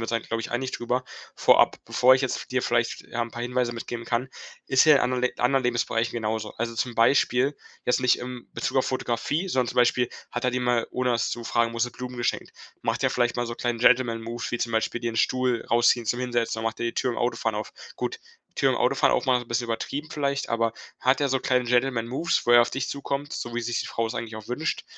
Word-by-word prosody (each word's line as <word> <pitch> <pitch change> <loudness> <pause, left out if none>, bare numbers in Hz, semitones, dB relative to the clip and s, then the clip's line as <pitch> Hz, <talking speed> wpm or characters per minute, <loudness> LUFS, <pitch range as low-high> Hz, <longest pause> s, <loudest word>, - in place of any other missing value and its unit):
uns 115 - -3
da, 115 - +1
glaube 115 0 -4
ich, 115 - -6
einig 130 +2 -2
drüber. 125 +2 -2 0.3
Vorab, - - +5
bevor 130 +1 +5
ich - - -3
jetzt 130 -2 -1
v - - -8
dir 130 0 0
vielleicht, 120 -1 0
ja, 120 0 -2
'n 115 - -5
paar 120 0 -6
Hinweise 125 -1 0
mitgeben 120 0 -6
kann. 120 +2 -1 0.4
Ist 130 +3 +4
er 150 - +9
in - - +2
anderen 125 0 0
Le 125 - +2
anderen 135 +2 +2
Lebensbereichen 120 -1 0
genauso? 110 -2 -2
Also 115 0 -3
zum 120 0 -2
Beispiel, 130 +3 +3 0.3
jetzt 125 - +2
nicht 125 -1 +3
im 125 0 -7
Bezug 135 - 0
auf - - +1
Fotografie, 130 - -1
sondern 125 -6 +1
zum - - -6
Beispiel 125 0 +3 0.2
hat 120 - -3
er 125 - +2
dir 125 0 -1
mal, 120 -2 +1
ohne 125 0 0
das 115 -1 0
zu 120 - -5
fragen, 115 0 +1
nur 115 - -6
so 125 +1 0
Blumen 125 0 -7
geschenkt, 120 - -2 0.3
macht - - -1
er - - +3
vielleicht 120 -1 +1
mal 120 - -1
so 120 - -4
'n - - -8
kleinen 120 -1 -2
Gentleman-Move 115 -1 +2
wie 120 - -2
zum 115 -1 -2
Beispiel 110 +2 0
dir 115 -1 -2
'n - - -7
Stuhl 125 -1 +1
rausziehen 120 0 +4
zum 120 - 0
Hinsetzen 120 -3 -1
oder 110 - -4
macht - - -9
er 120 - 0
die 115 - -3
Tür 125 -2 0
im - - -4
Autofahren 115 -2 -1
auf. 105 - -5 0.2
Gut, 455 - -3 0.4
Tür - - +2
im - - +1
Autofahren - - +3
aufmachen 125 -2 +2
ist 120 - -10
'n - - -23
bisschen 115 +1 0
übertrieben 140 +7 -4
vielleicht, 140 -2 -2
aber 115 -1 +1 0.3
hat 130 +2 +3
der 140 -2 +1
so 135 - +2
kleine 125 0 +1
Gentleman-Moves, 125 +4 +1
wo 120 - +1
er 120 - +9
auf 120 - +2
dich 135 0 -3
zukommt, 140 0 -4
so 120 0 -5
wie 120 - -1
es 115 - -4
sich 120 - -1
die - - -4
Frau 115 - -1
es 115 - -5
eigentlich 115 -1 -5
auch 110 - -9
wünscht, 150 +6 -2
120 Hz, 255 wpm, -26 LUFS, 115-125 Hz, 0.4 s, er